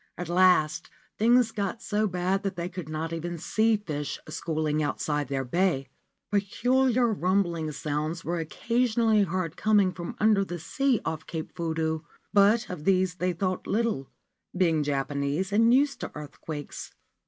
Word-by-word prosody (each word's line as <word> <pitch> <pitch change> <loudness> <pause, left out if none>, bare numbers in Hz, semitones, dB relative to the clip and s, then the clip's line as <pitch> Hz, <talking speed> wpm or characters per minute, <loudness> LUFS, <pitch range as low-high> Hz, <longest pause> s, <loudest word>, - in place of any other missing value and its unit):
At 175 -1 -5
last 175 -4 +3 0.3
things 235 +1 +4
got 200 +1 -3
so 215 -1 0
bad 185 +1 0
that 195 - -3
they 170 0 -3
could 180 -4 -7
not 160 +1 -3
even 170 +1 -4
see 220 +6 +2
fish 150 -8 -4
schooling 155 -1 -1
outside 145 -1 -1
their 135 0 -2
bay. 135 -2 0 0.4
Peculiar 245 +5 +2
rumbling 175 -4 0
sounds 155 +3 -3
were 170 +1 -1
occasionally 230 +5 +1
heard 185 -4 -1
coming 205 -3 +3
from 175 +4 -6
under 215 -2 +4
the 175 -2 -5
sea 255 - 0
off 160 -1 -4
Cape 160 -2 -5
Fudo; 160 -1 -1 0.3
but 210 +3 +4
of 180 -7 -6
these 185 0 +2
they 180 0 0
thought 185 +1 -2
little, 220 - 0 0.5
being 165 -4 +3
Japanese 140 +5 -1
and 230 +2 +5
used 275 +3 +3
to - - -5
earthquakes. 150 0 -7
180 Hz, 150 wpm, -27 LUFS, 155-210 Hz, 0.5 s, and